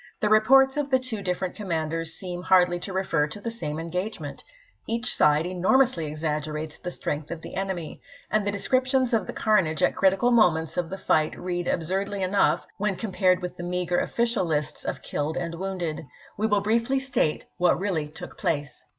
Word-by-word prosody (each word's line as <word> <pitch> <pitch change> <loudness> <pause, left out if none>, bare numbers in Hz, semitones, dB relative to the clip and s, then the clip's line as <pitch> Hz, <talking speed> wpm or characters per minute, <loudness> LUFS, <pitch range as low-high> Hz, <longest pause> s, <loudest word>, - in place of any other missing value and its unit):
The 210 - +1
reports 265 +6 +5
of 290 -1 -1
the 260 - +4
different 200 -8 -3
commanders 165 -4 -2
seem 180 -2 -4
hardly 180 -1 +4
to 180 +2 -5
refer 175 -5 +1
to 155 - -8
the 230 +3 -4
same 155 -10 -4
engagement; 170 -2 -4 0.4
each 235 +2 0
side 150 +1 +4
enormously 185 +1 +2
exaggerates 150 0 -3
the 180 - -5
strength 150 -3 -4
of 170 -1 -6
the - - -8
enemy, 190 -4 -4 0.3
and 215 -1 +2
the - - +2
descriptions 255 +4 +1
of 215 -6 +1
the - - -5
carnage 185 -9 +2
at - - +3
critical 195 +5 +3
moments 165 -9 +3
of 175 -2 -1
the 195 - -5
fight 155 -4 +1
read 175 -1 -3
absurdly 190 +4 -1
enough 190 +2 +2
when 205 -1 0
compared 185 -3 +1
with 180 - -5
the 175 - -6
meager 180 0 0
official 235 -3 0
lists 155 -3 -2
of - - -4
killed 150 +2 -2
and 170 -1 -3
wounded. 175 -4 -4 0.3
We 215 +2 0
will 205 -2 +2
briefly 230 +5 +1
state 265 - 0
what 180 0 +3
really 180 -6 -1
took 150 - -10
place. 145 -3 -2
180 Hz, 180 wpm, -26 LUFS, 160-215 Hz, 0.4 s, reports